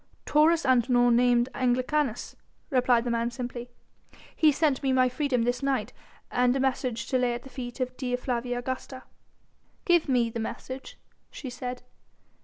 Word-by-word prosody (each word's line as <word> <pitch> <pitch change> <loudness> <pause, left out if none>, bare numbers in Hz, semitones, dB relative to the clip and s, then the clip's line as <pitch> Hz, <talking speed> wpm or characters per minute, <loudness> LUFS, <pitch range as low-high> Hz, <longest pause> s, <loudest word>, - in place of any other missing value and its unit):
"Taurus 320 +2 +4
Antinor 245 -1 +4
named 240 0 +4
Anglicanus," 255 0 0 0.4
replied 250 -3 +3
the 240 - -2
man 235 0 0
simply; 245 0 -6 0.7
"he 310 -2 +5
sent 285 -2 +1
me 270 - +1
my 255 -1 +4
freedom 255 -2 0
this 245 +2 -1
night 275 -1 -1 0.4
and 250 0 +2
a - - 0
message 255 -3 -1
to 255 - +2
lay 245 -1 +1
at 240 - -7
the 270 - -11
feet 245 -1 -7
of 255 0 -2
Dea 250 -2 -1
Flavia 245 -1 -2
Augusta." 255 +1 -5 0.8
"Give 345 -4 +3
me 240 -3 +2
the 230 - -4
message," 260 +4 -6 0.3
she 260 - -8
said. 250 0 -6
250 Hz, 160 wpm, -27 LUFS, 245-265 Hz, 0.8 s, he